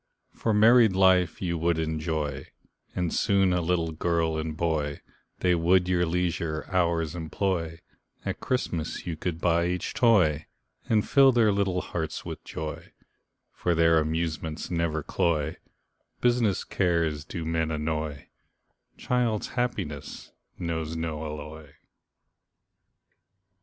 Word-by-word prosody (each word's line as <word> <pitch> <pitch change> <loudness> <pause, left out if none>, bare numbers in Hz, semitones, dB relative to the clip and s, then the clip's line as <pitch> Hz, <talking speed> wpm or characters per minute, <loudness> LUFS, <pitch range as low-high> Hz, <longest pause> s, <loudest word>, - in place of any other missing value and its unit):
For 115 - -1
married 110 0 +6
life 95 -2 +3
you 85 -2 -1
would 85 0 +1
enjoy, 80 -3 -2 0.5
And 90 -2 -1
soon 100 -3 +3
a 90 - +1
little 85 -1 0
girl 80 0 0
and 80 0 -3
boy, 80 -4 -1 0.4
They 90 -1 +3
would 90 +2 +3
your 90 -1 +2
leisure 85 -3 -1
hours 85 -3 +1
employ, 85 0 -2 0.4
At - - -3
Christmas 85 -11 -2
you 85 -2 -3
could 80 +1 -4
buy 85 0 +2
each 90 0 -2
toy, 90 - +3 0.4
And 110 -2 +2
fill 135 -1 +6
their 115 -4 +4
little 95 -2 0
hearts 80 -2 -4
with - - -7
joy, 80 -1 -7 0.6
For 85 -1 0
their 80 0 +4
amusements 80 0 -3
never 85 -3 -1
cloy, 80 -2 0 0.6
Business 120 -5 +2
cares 85 -5 0
do 85 +1 -6
men 80 0 0
annoy, 75 -2 -3 0.7
Child's 120 -4 0
happiness 100 - -4 0.3
knows 80 -2 -3
no 80 -1 -3
alloy. 75 -1 -8
85 Hz, 120 wpm, -27 LUFS, 80-90 Hz, 0.7 s, married